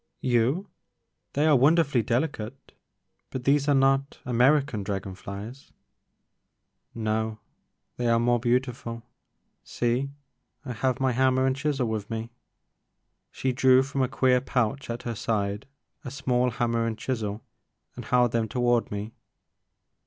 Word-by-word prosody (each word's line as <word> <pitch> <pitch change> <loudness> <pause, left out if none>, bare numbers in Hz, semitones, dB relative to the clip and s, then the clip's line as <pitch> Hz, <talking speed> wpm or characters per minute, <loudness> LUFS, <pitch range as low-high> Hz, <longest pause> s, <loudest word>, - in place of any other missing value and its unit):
You! 130 - +1 0.7
They 145 +2 +2
are 155 -2 +5
wonderfully 145 -1 +4
delicate, 120 +1 -3 0.3
— - - -51
but 130 - -5
those 140 +2 +2
are 145 - +4
not 135 +1 +2
American 125 0 +3
dragon 95 -1 -4
flies 100 +7 -9 0.3
— - - -52
*' - - -45 0.2
No 110 0 -1 0.3
— - - -52
they 120 - -1
are 115 0 +4
more 120 +1 +2
beautiful. 120 -1 -1 0.6
See, 120 +3 -1 0.6
I 125 - -4
have 130 +2 -1
my 130 -1 +2
hammer 130 +1 +2
and 130 0 +2
chisel 140 -3 -1
with 110 -2 -3
me." 115 +1 -4 1.0
She 130 - -2
drew 130 +1 +5
from 140 0 -2
a 130 - +2
queer 130 -1 +3
pouch 130 0 -1
at 115 +1 -4
her 120 - -3
side 105 -1 -2 0.4
a 130 - -5
small 125 -2 0
hammer 115 -1 0
and 110 -1 -3
chisel 110 -5 -3 0.5
and - - -7
held 125 -1 +3
them 115 -1 0
toward 120 -1 +1
me. 105 +2 -5
125 Hz, 145 wpm, -26 LUFS, 115-135 Hz, 1.0 s, are